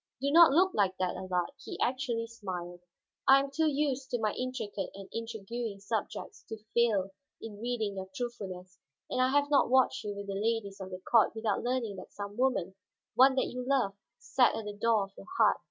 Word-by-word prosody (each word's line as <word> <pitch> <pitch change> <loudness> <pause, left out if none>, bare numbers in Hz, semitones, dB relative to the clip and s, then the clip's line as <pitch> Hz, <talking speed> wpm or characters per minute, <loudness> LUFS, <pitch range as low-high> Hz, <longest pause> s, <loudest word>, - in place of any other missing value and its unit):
Do 280 +2 0
not 330 -1 +8
look 370 +6 +4
like 190 -2 +1
that, 185 -1 -1
Allard;" 180 +3 -2
he - - -7
actually 245 -2 0
smiled. 180 -6 -6 0.5
"I 270 +1 +8
am 275 0 -3
too 315 +3 +2
used 275 -3 0
to 245 - -1
my 215 -2 0
intricate 250 -7 -4
and 195 -1 -9
intriguing 225 -1 -5
subjects 200 +2 -4
to 220 - -5 0.2
fail 210 -5 +2 0.3
in 210 -2 -9
reading 225 -4 -2
your 190 0 -5
truthfulness. 185 -7 -6 0.3
And 255 - +1
I 255 - +4
have 285 +1 +2
not 280 - +4
watched 260 0 +3
you 205 -1 -4
with 200 0 -6
the 200 - -4
ladies 205 -1 -1
of 190 - -6
the 185 - -6
court 225 +4 +3
without 220 -2 0
learning 240 -5 -1
that 185 - -11
some 205 0 -6
woman, 245 -7 +1 0.4
one 260 +3 +6
that 260 - 0
you 250 0 -4
loved, 245 -7 0 0.2
sat 250 -2 +3
at 220 -1 -4
the 210 - -5
door 215 0 +2
of 195 - -9
your - - -12
heart." - - +5
225 Hz, 200 wpm, -31 LUFS, 200-255 Hz, 0.5 s, not